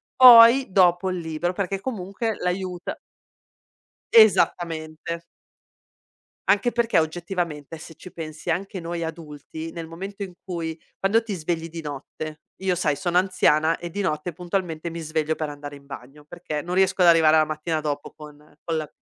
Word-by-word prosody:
poi 245 +1 +9
dopo 180 0 +4
il 185 - -2
libro, 165 +1 -2
perché 195 +1 -3
comunque 220 -1 -3
l'aiuta" 180 0 -3 1.2
Esattamente. 170 -6 +3 1.3
Anche 205 +4 +3
perché, 235 -6 +2
oggettivamente, 165 -2 -3
se 160 +1 -11
ci 185 - -13
pensi, 160 +1 -5
anche 195 +3 -3
noi 170 0 -4
adulti 160 0 -7
nel 165 -1 -7
momento 195 +5 -8
in 190 -2 -5
cui 165 -3 -5 0.2
quando 220 +4 +2
ti 220 -2 -5
svegli 165 -1 -3
di 165 0 -7
notte 155 +2 -7 0.2
io, 190 -1 +1
sai, 155 -4 0
sono 175 +2 0
anziana 165 -4 +3
e 175 - -6
di 200 +4 -4
notte 170 -2 -2
puntualmente 175 -1 -3
mi 170 - -6
sveglio 155 -1 -1
per 155 -1 -3
andare 145 0 -8
in 140 0 -16
bagno 140 +2 -11
perché 155 -1 -5
non 175 +4 -4
riesco 190 0 +2
ad 180 - +6
arrivare 160 -2 +6
alla 155 0 +5
mattina 155 +1 -3
dopo 145 -1 -4
con 150 -1 -12 0.3
con 165 -2 -2
la 155 -2 -4
170 Hz, 160 wpm, -24 LUFS, 155-185 Hz, 1.3 s, poi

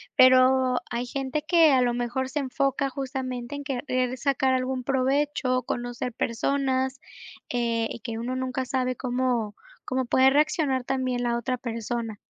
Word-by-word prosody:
pero 255 0 +5
hay 240 +1 -2
gente 270 +3 -3
que 330 -3 +6
a 260 -1 +4
lo 240 -1 +2
mejor 245 +2 -2
se 295 - -2
enfoca 275 +1 0
justamente 260 -1 -4
en 285 - -6
querer 255 -2 -1
sacar 265 0 +1
algún 255 0 -1
provecho, 265 -1 +1
conocer 245 0 -4
personas, 260 +3 0 0.5
eh, 230 -2 0
y - - -6
que 225 0 -5
uno 245 +3 -3
nunca 260 0 -2
sabe 255 -1 -1
cómo 245 -4 -1 0.3
cómo 260 0 -1
puede 260 +2 +5
reaccionar 290 -2 +2
también 255 -2 -1
la 235 0 +1
otra 250 +2 -2
persona. 230 -2 -4
255 Hz, 150 wpm, -26 LUFS, 245-265 Hz, 0.5 s, que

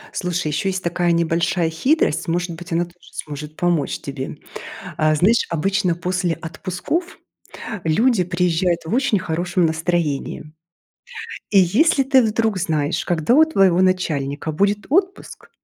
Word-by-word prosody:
Слушай, 180 -2 -2
еще 150 +6 -1
есть 190 0 -3
такая 175 0 0
небольшая 170 0 +1
хитрость, 255 - +1
может 175 +1 -1
быть, 170 +2 -9
она 170 +1 +1
тоже 175 0 -20
сможет 150 +1 -8
помочь 170 -5 0
тебе. 135 -1 -6 0.6
А, 155 0 +3
знаешь, 200 +10 +3
обычно 185 +2 0
после 180 0 -1
отпусков 185 - -4 0.7
люди 195 +5 +2
приезжают 175 0 0
в 160 - -6
очень 240 -4 +2
хорошем 175 +2 0
настроении. 160 -2 -2 1.0
И 200 - +5
если 260 - +3
ты 265 0 +4
вдруг 220 -1 0
знаешь, 155 -4 -1
когда 175 +7 +2
у 315 +2 +7
твоего 195 - +3
начальника 155 -6 0
будет 200 +6 0
отпуск, 375 +6 -1
175 Hz, 135 wpm, -20 LUFS, 160-195 Hz, 1.0 s, у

